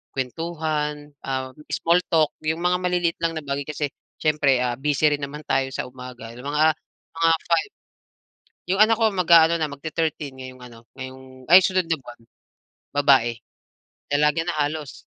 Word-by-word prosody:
kwentuhan, 150 Hz, +1 st, -3 dB, 0.2 s
um 130 Hz, -1 st, -3 dB, 0.2 s
small 170 Hz, +2 st, +3 dB
talk, 160 Hz, -3 st, +3 dB
yung 160 Hz, +2 st, -1 dB
mga 180 Hz, 0 st, +3 dB
maliliit 180 Hz, -2 st, 0 dB
lang 165 Hz, 0 st, 0 dB
na 155 Hz, -, -5 dB
bagay. 140 Hz, 0 st, -3 dB
Kasi 150 Hz, -1 st, -2 dB, 0.3 s
siyempre, 150 Hz, -4 st, +2 dB
ah 120 Hz, -1 st, -1 dB
busy 150 Hz, +1 st, +2 dB
rin 145 Hz, -, -8 dB
naman 150 Hz, +2 st, -8 dB
tayo 135 Hz, 0 st, +1 dB
sa -, -, -2 dB
umaga, 125 Hz, -2 st, -10 dB
yung 125 Hz, +2 st, -11 dB
mga 150 Hz, +2 st, +3 dB, 0.4 s
mga 165 Hz, 0 st, +3 dB, 0.2 s
5. 170 Hz, -, +1 dB, 1.0 s
'Yong 195 Hz, +2 st, +2 dB
anak 225 Hz, +1 st, +2 dB
ko 225 Hz, -1 st, +3 dB
mag-aano 170 Hz, -3 st, +5 dB
na, 160 Hz, -2 st, -1 dB
mag 140 Hz, 0 st, -10 dB
te-thirteen 155 Hz, -3 st, -3 dB
ngayong 130 Hz, -1 st, -10 dB
ano, 120 Hz, -2 st, -12 dB, 0.2 s
ngayong 130 Hz, 0 st, -10 dB
ay 180 Hz, +3 st, +10 dB
sunod 185 Hz, -1 st, +1 dB
na 165 Hz, -, +1 dB
buwan. 120 Hz, -1 st, -13 dB, 0.7 s
Babae. 135 Hz, -5 st, +4 dB, 0.8 s
Dalaga 150 Hz, +2 st, +3 dB
na 175 Hz, -, -2 dB
halos. 150 Hz, -1 st, -4 dB
150 Hz, 160 wpm, -23 LUFS, 130-165 Hz, 1.0 s, ay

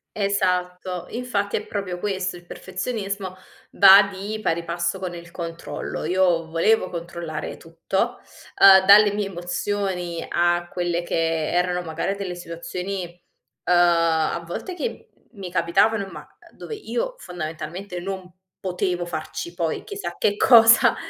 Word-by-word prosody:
Esatto. 180 Hz, -3 st, -1 dB
Infatti, 220 Hz, -5 st, -2 dB
è 210 Hz, -, -5 dB
proprio 190 Hz, -3 st, -4 dB
questo, 185 Hz, -2 st, -2 dB
il 175 Hz, -, -14 dB
perfezionismo 195 Hz, 0 st, -5 dB, 0.4 s
va 195 Hz, 0 st, +8 dB
di 205 Hz, +3 st, -5 dB
pari 170 Hz, +1 st, 0 dB
passo 170 Hz, +3 st, -2 dB
con 180 Hz, -2 st, -5 dB
il 170 Hz, 0 st, -10 dB
controllo. 165 Hz, -5 st, -6 dB
Io 175 Hz, -1 st, +2 dB
volevo 185 Hz, +4 st, +2 dB
controllare 170 Hz, -2 st, -6 dB
tutto, 165 Hz, +4 st, -3 dB, 0.4 s
uhm, 190 Hz, -1 st, +9 dB
dalle 205 Hz, +1 st, +7 dB
mie 205 Hz, -1 st, -1 dB
emozioni 180 Hz, -1 st, -3 dB
a 175 Hz, 0 st, +1 dB
quelle 175 Hz, -1 st, -1 dB
che 165 Hz, -2 st, -1 dB
erano, 180 Hz, 0 st, +1 dB
magari, 165 Hz, +3 st, -3 dB
delle 195 Hz, -3 st, -5 dB
situazioni, 180 Hz, +2 st, -5 dB, 0.6 s
uhm, 180 Hz, -, +3 dB
a 170 Hz, -1 st, +3 dB
volte 355 Hz, -, -6 dB
che 470 Hz, +6 st, -5 dB
m 220 Hz, -, -29 dB
mi 180 Hz, -2 st, -6 dB
capitavan 195 Hz, +5 st, +2 dB
ma, -, -, -8 dB, 0.3 s
uhm, -, -, -26 dB
dove 450 Hz, -, -7 dB
io -, -, -3 dB
fondamentalmente 175 Hz, -, -6 dB
non 185 Hz, 0 st, -6 dB, 0.3 s
potevo 180 Hz, -1 st, -1 dB
farci 155 Hz, 0 st, -5 dB
poi 170 Hz, -2 st, -2 dB
chissà 410 Hz, 0 st, -6 dB
che 205 Hz, 0 st, +1 dB
cosa. 230 Hz, -2 st, +7 dB
180 Hz, 135 wpm, -23 LUFS, 170-200 Hz, 0.6 s, uhm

